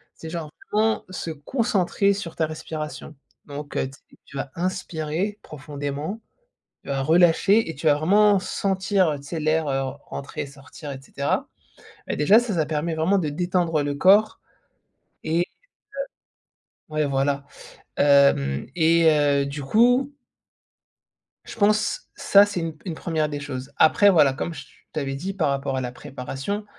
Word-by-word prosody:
C'est 160 - -9
genre 165 -3 -5 0.2
vraiment 220 +1 +2
se 170 - -5
concentrer 200 - 0
sur 175 -5 -6
ta 160 - 0
respiration. 155 -1 -7 0.3
Donc 145 0 -7
heu, - - 0
t 135 - -13 0.3
tu 140 - -10
vas 135 - -4
inspirer 180 +1 -2
profondément, 145 +5 -5 0.6
tu - - -15
vas 135 -1 -1
relâcher 175 +6 +4
et 160 - -5
tu 145 - -11
vas 150 - +6
vraiment 200 +7 +4
sentir, 190 -1 0
heu, 145 - -3
tu 140 - -14
sais, 160 +2 -5
l'air, 155 0 +1
heu, 135 0 0 0.3
entrer 150 +2 -5
et - - -6
sortir 140 +2 -11
et 135 - -7
cetera. 140 +1 -2 0.6
Et - - -1
déjà, 195 +9 +6
ça 240 -3 -3
ça 160 -2 +1
permet 160 +2 -2
vraiment 175 +6 +2
de 155 -5 0
détendre 175 -1 0
le 145 0 -2
corps 205 +7 +4 0.8
et 165 +2 +1
heu - - +3 1.5
ouais, 155 -1 +1
voilà. 140 +1 0 0.5
Hem 140 - +4
et 165 0 +4
heu, 145 -2 +2
du 140 +1 -5
coup 245 - +3 1.3
je - - -9
pense 215 - +1
ça, 200 +1 +6
c'est 200 -3 -4
une 165 -1 -4
p - - -27
une - - -3
1re 155 -3 -1
des 145 -1 -4
choses. 135 -1 -6
Après, 200 +6 +5
voilà, 150 -7 +5
comme 165 +4 -4
je 145 - -9 0.3
t'avais 135 -2 -2
dit 190 +8 -4
par 160 -7 0
rapport 140 0 -1
à - - -1
la 125 -1 -4
préparation, 135 +12 -5
155 Hz, 165 wpm, -24 LUFS, 140-190 Hz, 1.5 s, vas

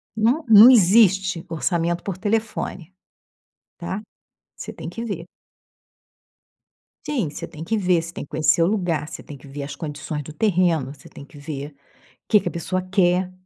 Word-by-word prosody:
Não 235 +9 +2
não 220 +2 +10
existe 195 -4 +4
orçamento 170 +1 -1
por 195 -3 -4
telefone, 205 -4 -3 0.9
tá. 190 +4 -5 0.5
Você - - -7
tem - - -8
que 230 - -6
ver. 195 -7 -5 1.8
Sim, 240 - -1
você - - -7
tem 155 - -10
que 220 +7 -1
ver, 180 -4 +2
você 170 +1 -8
tem - - -6
que - - -20
conhecer 155 +2 +3
o - - +3
lugar, 175 -7 -1
você - - -8
tem 145 - -11
que 130 - -16
ver 140 +1 -7
as 140 +1 -7
condições 150 -1 -5
do 155 - -9
terreno, 170 - +1
você 145 - -15
tem 140 - -12
que 145 - -16
ver 145 0 -6 0.6
que 210 - +6
que 195 - -3
a - - -5
pessoa 185 +2 -2
quer, 185 -1 +1
175 Hz, 175 wpm, -22 LUFS, 155-200 Hz, 1.8 s, não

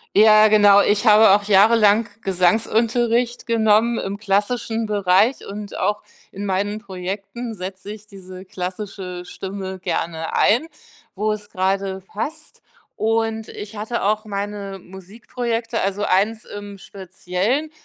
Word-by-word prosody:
Ja, 215 +1 +7
genau, 205 -1 +6
ich 210 +3 +1
habe 215 0 +7
auch 205 0 +3
jahrelang 210 +2 +5 0.2
Gesangsunterricht 230 +6 +1
genommen 225 0 +2
im 195 +1 -4
klassischen 220 +3 -1
Bereich 205 +4 +2
und 205 0 -7
auch 205 +2 -1 0.3
in 200 +1 -5
meinen 205 +2 -1
Projekten 195 +4 -6
setze 190 +1 -7
ich 215 0 -14
diese 185 -2 -11
klassische 185 -1 -6
Stimme 190 +1 -7
gerne 165 -2 -3
ein, 245 +10 +3 0.5
wo 215 +2 0
es 210 -1 -6
gerade 190 +1 -1
passt. 305 +11 -7 0.4
Und 225 0 -1
ich 205 +1 -9
hatte 220 +3 -3
auch 215 +2 0
meine 200 -1 -5
Musikprojekte, 225 +5 -5
also 200 +1 -1
1 210 +4 +1
im 205 -1 -9
Speziellen, 195 - -3
205 Hz, 125 wpm, -21 LUFS, 195-220 Hz, 0.5 s, Ja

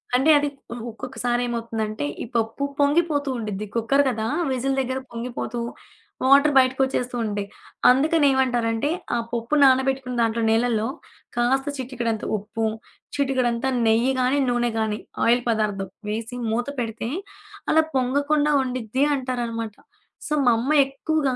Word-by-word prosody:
అంటే, 265 +5 +3
అది 290 0 +1 0.4
ఒక్కొక్కసారి 240 +2 -2
ఏమవుతుందంటే, 225 -6 -3 0.2
ఈ - - -5
పప్పు 225 +5 -1 0.2
పొంగిపోతూ 290 0 +2
ఉండిద్ది. 210 -2 -4
కుక్కర్ 255 +5 +3
కదా! 220 -3 -2 0.2
విజిల్ 265 +1 0
దగ్గర 260 0 -2
పొంగిపోతూ, 235 0 -4 0.7
వాటరు 280 +2 +6
బయటికోచ్చేస్తూ 260 -1 +1
ఉంటయి. 205 -1 -3 0.4
అందుకనే 290 +3 +3
ఏమంటారంటే, 245 -1 +1 0.3
ఆ - - +2
పప్పు 235 +4 -1
నానబెట్టుకూన 265 -1 +3
దాంట్లో 230 0 +1
నీలల్లో 225 -1 +2 0.5
కాస్త 265 +3 +2
చిటికేడంత 240 -4 -3
ఉప్పు 220 +2 -3 0.5
చిటికేడంతా 260 -2 +1 0.2
నెయ్యి 230 +4 +3
గాని, 255 +3 +2
నూనె 240 0 +1
గాని 215 -1 -1 0.3
ఆయిల్ 240 +2 +4
పదార్థం 205 -4 0 0.2
వేసి, 225 +3 -4 0.2
మూత 240 +3 -1
పెడితే 230 -1 -3 0.6
అలా 320 - +5
పొంగకుండా 285 +4 +2
ఉండిద్ది 255 0 -1
అంటారనమాట. 235 -4 -3 0.5
సో, 305 - -1
మా 240 - +6
అమ్మ 260 +6 -1 0.2
ఎక్కువగా 275 0 -1
245 Hz, 125 wpm, -23 LUFS, 225-270 Hz, 0.7 s, వాటరు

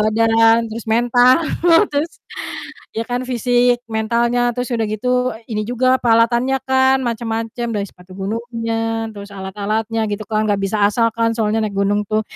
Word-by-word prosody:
badan, 225 +1 +3
terus 225 +1 -7
mental. 245 +2 +4 0.6
terus, 300 +4 0 0.9
ya - - +1
kan 245 +1 -1
fisik, 245 0 +2
mentalnya 235 +2 0
terus 250 +2 -3
udah 225 -2 0
gitu, 215 +4 -2 0.4
ini 215 -2 -2
juga 245 +1 0
peralatannya 235 +3 +3
kan, 265 0 +4
macam-macam 230 0 -3
dari 200 -1 -1
sepatu 180 +1 -19
gunungnya, 225 +1 -3
terus 200 0 -9
alat-alatnya 210 +3 -3
gitu 205 +1 -3
kan 215 0 +1
gak 200 -1 +1
bisa 200 +2 -1
asal 230 +2 +1
kan 230 0 +2
soalnya 220 0 +1
naik 205 - -5
gunung 205 +1 +1
tuh. 215 0 +1
225 Hz, 150 wpm, -18 LUFS, 215-240 Hz, 0.9 s, mental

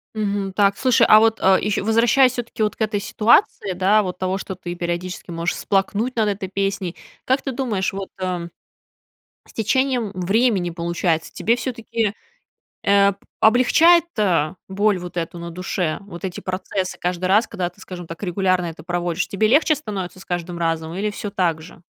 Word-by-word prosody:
Мгм. 200 -2 -2
Так, 200 0 +2
слушай, 255 -2 +4
а 215 - +8
вот, 225 0 +3
э, 190 0 +5
ещ 210 -1 0
возвращаясь 235 +4 +4
всё-таки 235 -3 -3
вот 210 - 0
к - - -13
этой 215 -2 0
ситуации, 205 -2 +2
да, 195 +4 +3
вот 180 -3 -4
того, 185 +1 -1
что 190 - -6
ты 175 -1 -6
периодически 175 +1 -4
можешь 170 0 -2
всплакнуть 205 +5 0
над 220 -3 +2
этой 195 -2 -4
песней, 195 -2 -2 0.3
как 260 +2 +2
ты 270 - -2
думаешь 235 -8 -1
вот, 195 0 -5
э, 180 -2 -3 1.0
с - - -18
течением 245 -1 0
времени, 195 0 +1
получается, 170 -1 -1
тебе 230 - +1
всё-таки, 230 -3 -2 0.7
э, 200 0 +4 0.3
облегчает, 305 +9 +5
э, 175 -7 +2 0.2
боль 200 +1 +2
вот 175 0 -8
эту 170 +1 -3
на 170 0 -7
душе, 175 -2 -2
вот 190 -3 -11
эти 185 -2 -4
процессы 185 0 -3
каждый 180 0 -2
раз, 205 +5 +4
когда 180 -2 -3
ты, 180 +3 -21
скажем 180 -2 -8
так, 165 +5 -8
регулярно 185 0 +1
это 160 -1 -8
проводишь? 175 +1 -2
Тебе 215 +2 +1
легче 305 +5 +4
становится 195 -10 -6
с - - -13
каждым 175 0 -4
разом 165 -1 -2
или 200 +4 -1
всё 205 0 -5
так 175 -5 0
же? 165 - -14
195 Hz, 180 wpm, -21 LUFS, 175-215 Hz, 1.0 s, а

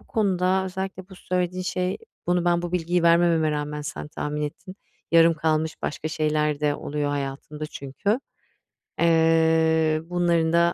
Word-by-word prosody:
bu - - -23
konuda 190 -3 +1
özellikle 190 0 -5
bu 190 - -12
söylediğin 180 0 -2
şey 180 0 -2 0.3
bunu 175 0 +1
ben 175 0 +2
bu 175 - -4
bilgiyi 175 0 0
vermememe 170 -2 +4
rağmen 150 0 -3
sen 150 0 -6
tahmin 150 0 -4
ettin. 165 +5 -6 0.4
Yarım 165 0 +6
kalmış 160 0 0
başka 155 +1 -3
şeyler 150 -1 0
de 145 -1 +1
oluyor 145 0 -2
hayatımda 145 +2 -4
çünkü. 150 - -2 0.8
Eee, 160 -1 +3
bunların 170 -2 +1
da 170 0 +4
165 Hz, 145 wpm, -24 LUFS, 150-180 Hz, 0.8 s, Yarım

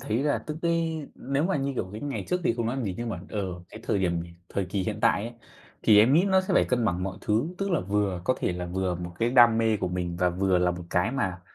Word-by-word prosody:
thấy 110 - -2
là 145 0 +1
tức 155 - -4
cái 165 -3 0
nếu 140 +3 -1
mà, 175 -4 +1
như 140 0 -1
kiểu, 95 - -3
cái 105 - -6
ngày 145 -1 -4
trước 180 0 0
thì - - +2
không 115 -1 -2
nói 120 +3 -1
làm 130 - -2
gì, 95 -3 -2
nhưng 120 0 -3
mà, 90 -6 -4
ờ, 95 -4 -4
cái 110 - -11
thời 105 - 0
điểm 85 -3 0 0.3
thời 100 - -2
kỳ 95 +1 -2
hiện 105 +2 -3
tại 100 - +3
ấy 115 - -5 0.5
thì 105 -2 +6
em 115 +5 +6
nghĩ 170 +4 +5
nó 190 -1 +4
sẽ 185 - -1
phải - - +5
cân 125 -2 0
bằng 90 -4 0
mọi 95 +1 -4
thứ, 110 +8 +1
tức 195 0 -1
là 170 - +2
vừa 100 -1 -1
có 130 - +2
thể - - 0
là 90 0 -4
vừa 90 0 -1
một 85 0 -6
cái 115 +1 +1
đam 120 -3 +6
mê 110 -1 +2
của 95 -2 -2
mình 90 -1 -3
và 90 0 +2
vừa 95 +1 +1
là 90 0 +2
một 90 0 -5
cái 90 +4 +1
mà 95 -10 -2
105 Hz, 290 wpm, -27 LUFS, 90-135 Hz, 0.5 s, thì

